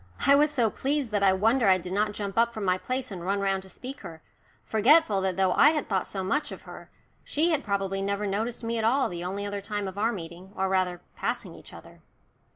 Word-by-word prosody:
I 280 Hz, -, +7 dB
was 295 Hz, +2 st, +5 dB
so 240 Hz, -7 st, +1 dB
pleased 275 Hz, -3 st, -2 dB
that 205 Hz, -1 st, 0 dB
I 195 Hz, -1 st, +5 dB
wonder 225 Hz, +5 st, +2 dB
I 190 Hz, -1 st, +6 dB
did 180 Hz, 0 st, -7 dB
not 210 Hz, +1 st, +1 dB
jump 200 Hz, -2 st, -5 dB
up 235 Hz, +1 st, +3 dB
from 215 Hz, -3 st, -5 dB
my 185 Hz, 0 st, +2 dB
place 255 Hz, +1 st, -3 dB
and 180 Hz, -3 st, -6 dB
run 200 Hz, +2 st, 0 dB
round 195 Hz, -1 st, 0 dB
to 190 Hz, -, -13 dB
speak 260 Hz, +7 st, -7 dB
to 190 Hz, -, -9 dB
her, 160 Hz, -2 st, -11 dB, 0.4 s
forgetful 220 Hz, -2 st, +4 dB
that 190 Hz, -1 st, -1 dB
though 190 Hz, -1 st, +3 dB
I 290 Hz, -, +6 dB
had 300 Hz, -3 st, -2 dB
thought 190 Hz, -3 st, -1 dB
so 190 Hz, -2 st, -4 dB
much 280 Hz, +11 st, -1 dB
of -, -, -9 dB
her, -, -, -11 dB, 0.3 s
she 325 Hz, +4 st, +1 dB
had 300 Hz, -3 st, +1 dB
probably 195 Hz, -1 st, -1 dB
never 200 Hz, +1 st, -1 dB
noticed 220 Hz, +5 st, -2 dB
me 230 Hz, 0 st, -1 dB
at -, -, -1 dB
all 260 Hz, +5 st, +2 dB
the 175 Hz, -1 st, -6 dB
only 195 Hz, +3 st, -3 dB
other 205 Hz, 0 st, -4 dB
time 205 Hz, 0 st, -3 dB
of 190 Hz, +1 st, -6 dB
our 225 Hz, +3 st, +2 dB
meeting, 180 Hz, -1 st, -9 dB
or 190 Hz, -, 0 dB
rather 185 Hz, -2 st, 0 dB
passing -, -, -3 dB
each -, -, -14 dB
other. -, -, -14 dB
200 Hz, 250 wpm, -27 LUFS, 190-235 Hz, 0.4 s, I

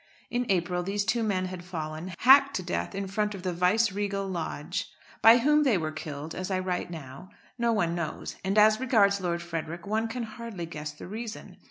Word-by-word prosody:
In 245 Hz, 0 st, -1 dB
April 180 Hz, -1 st, +1 dB
these 200 Hz, +3 st, -1 dB
two 230 Hz, +5 st, +1 dB
men 195 Hz, -4 st, 0 dB
had 185 Hz, -1 st, -6 dB
fallen, 160 Hz, 0 st, -5 dB
hacked 275 Hz, +2 st, +6 dB
to 185 Hz, -, -2 dB
death 180 Hz, +2 st, -3 dB
in 195 Hz, 0 st, -2 dB
front 210 Hz, +2 st, -1 dB
of 185 Hz, -, -9 dB
the 180 Hz, -1 st, -1 dB
Viceregal 195 Hz, +2 st, +1 dB
Lodge. 170 Hz, -5 st, -3 dB, 0.3 s
By 225 Hz, +2 st, +9 dB
whom 300 Hz, +5 st, +4 dB
they 260 Hz, -9 st, +3 dB
were 155 Hz, -2 st, -2 dB
killed, 155 Hz, 0 st, -6 dB
as 185 Hz, +1 st, -4 dB
I 190 Hz, -, +1 dB
write 185 Hz, -1 st, -2 dB
now, 160 Hz, +1 st, -9 dB, 0.3 s
no 235 Hz, 0 st, +2 dB
one 175 Hz, -7 st, +1 dB
knows, 170 Hz, -2 st, -4 dB
and 195 Hz, +2 st, 0 dB
as 215 Hz, +1 st, +6 dB
regards 205 Hz, -6 st, +3 dB
Lord 170 Hz, -1 st, -1 dB
Frederick 170 Hz, 0 st, -5 dB
one 220 Hz, +2 st, 0 dB
can 235 Hz, +2 st, -4 dB
hardly 220 Hz, -5 st, -6 dB
guess 155 Hz, -2 st, -6 dB
the 150 Hz, -, -11 dB
reason. 220 Hz, +3 st, -7 dB
190 Hz, 200 wpm, -28 LUFS, 170-220 Hz, 0.3 s, By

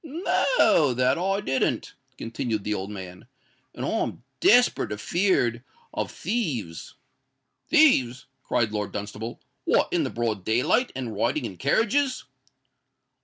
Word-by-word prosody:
"No 310 Hz, -, +2 dB
that 125 Hz, +5 st, +2 dB
I 195 Hz, +3 st, 0 dB
didn't," 130 Hz, -7 st, -1 dB, 0.2 s
continued 115 Hz, -2 st, -3 dB
the 105 Hz, -, -1 dB
old 95 Hz, -1 st, -4 dB
man; 95 Hz, -3 st, -9 dB, 0.5 s
"and -, -, -4 dB
I'm -, -, -2 dB, 0.2 s
desperate 245 Hz, -, +4 dB
afeard 120 Hz, -, 0 dB, 0.3 s
of -, -, -2 dB
thieves." 150 Hz, -, -3 dB, 0.7 s
"Thieves!" 140 Hz, -, +4 dB, 0.2 s
cried 110 Hz, -3 st, 0 dB
Lord 105 Hz, -1 st, -3 dB
Dunstable: 105 Hz, +3 st, -6 dB, 0.3 s
"what—in -, -, +2 dB
the -, -, -2 dB
broad 115 Hz, -5 st, -2 dB
day 110 Hz, +5 st, +1 dB
light, 250 Hz, -, +2 dB
and 125 Hz, -4 st, -4 dB
riding 120 Hz, +6 st, 0 dB
in 95 Hz, -, -6 dB
carriages?" 235 Hz, -, +1 dB
125 Hz, 120 wpm, -25 LUFS, -, 0.7 s, desperate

